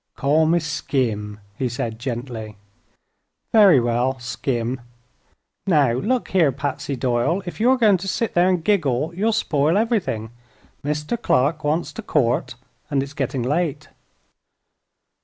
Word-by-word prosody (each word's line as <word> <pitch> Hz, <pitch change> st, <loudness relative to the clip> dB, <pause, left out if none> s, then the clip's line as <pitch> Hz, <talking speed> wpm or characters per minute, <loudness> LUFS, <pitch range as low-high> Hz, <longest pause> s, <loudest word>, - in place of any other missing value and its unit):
"Call 155 Hz, +3 st, +2 dB
me 170 Hz, +2 st, +3 dB
Skim," 120 Hz, -9 st, -2 dB, 0.2 s
he 130 Hz, -, 0 dB
said, 115 Hz, -1 st, -4 dB
gently. 115 Hz, -4 st, -5 dB, 1.0 s
"Very 200 Hz, -, +7 dB
well, 120 Hz, +2 st, 0 dB
Skim, 120 Hz, 0 st, -3 dB, 0.9 s
Now 150 Hz, -9 st, +4 dB
look 230 Hz, -, -1 dB
here, 170 Hz, -7 st, +3 dB
Patsy 140 Hz, +1 st, -3 dB
Doyle, 125 Hz, +9 st, 0 dB
if 175 Hz, -, -7 dB
you're 255 Hz, +4 st, +4 dB
going 215 Hz, -5 st, +4 dB
to 185 Hz, +2 st, -7 dB
sit 225 Hz, +3 st, -1 dB
there 175 Hz, +1 st, +4 dB
and 180 Hz, -3 st, 0 dB
giggle 160 Hz, -6 st, +1 dB
you'll 210 Hz, +6 st, +1 dB
spoil 160 Hz, -6 st, +1 dB
everything. 205 Hz, -, -1 dB, 0.5 s
Mr. 150 Hz, +10 st, -2 dB
Clark 150 Hz, -, +1 dB
wants 155 Hz, +3 st, -1 dB
to -, -, -6 dB
court, 135 Hz, -, 0 dB, 0.3 s
and 140 Hz, -2 st, +1 dB
it's 140 Hz, +1 st, -9 dB
getting 135 Hz, -3 st, -2 dB
late." 155 Hz, +2 st, -1 dB
145 Hz, 135 wpm, -22 LUFS, 125-175 Hz, 1.0 s, Very